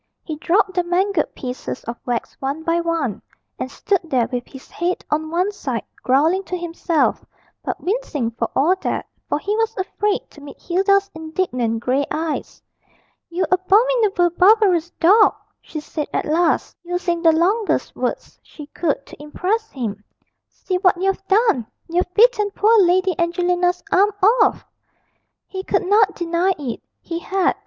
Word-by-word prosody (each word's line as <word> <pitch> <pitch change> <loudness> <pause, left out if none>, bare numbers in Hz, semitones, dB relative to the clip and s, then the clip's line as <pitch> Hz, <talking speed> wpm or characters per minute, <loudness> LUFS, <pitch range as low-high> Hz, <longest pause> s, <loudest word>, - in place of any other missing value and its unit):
He 315 - -5
dropped 375 +5 +1
the 355 -1 +1
mangled 360 0 0
pieces 250 0 -6
of 235 - -5
wax 240 -1 -2
one 280 +4 -3
by 335 +1 +1
one, 330 - -2 0.4
and 260 - -3
stood 390 +7 0
there 260 -8 +1
with 245 -1 -3
his 265 - -13
head 355 +1 -2
on 310 +1 0
one 360 +5 0
side, 260 - -4 0.2
growling 315 +9 +2
to 365 - -3
himself, 340 -1 0 0.4
but - - -3
wincing 350 - -2
for 230 0 -3
all 330 +7 +3
that, - - -3 0.2
for - - +1
he 405 +7 -2
was 450 0 -1
afraid 400 +2 -1
to 295 - -15
meet 285 0 -11
Hilda's 395 +2 +1
indignant 315 - -2
grey 260 +4 +1
eyes. 315 0 -4 0.7
'You 355 +2 -1
abominable, 390 -1 +3
barbarous 370 -2 +4
dog!' 410 +6 +5 0.3
she 310 - -7
said 300 0 -5
at - - -1
last, 325 +2 +1
using 350 -1 -2
the 330 -1 +6
longest 385 +7 +1
words - - -4
she 300 - -12
could 290 -1 -2
to - - -13
impress 395 +9 -2
him. 215 -6 -5 0.5
'See 370 -1 -3
what 365 -2 +3
you've 390 +1 0
done! 400 - +2 0.2
you've 355 +1 -1
bitten 435 -2 +4
poor 440 +2 +4
Lady 370 0 +3
Angelina's 355 +1 +1
arm 400 +3 +5 0.3
off.' - - +2 0.8
He 380 -1 -6
could 385 - 0
not 405 +1 +3
deny 345 +2 0
it; 265 -6 -5 0.2
he 335 -1 -4
had. 380 +1 0
350 Hz, 155 wpm, -20 LUFS, 305-390 Hz, 0.8 s, the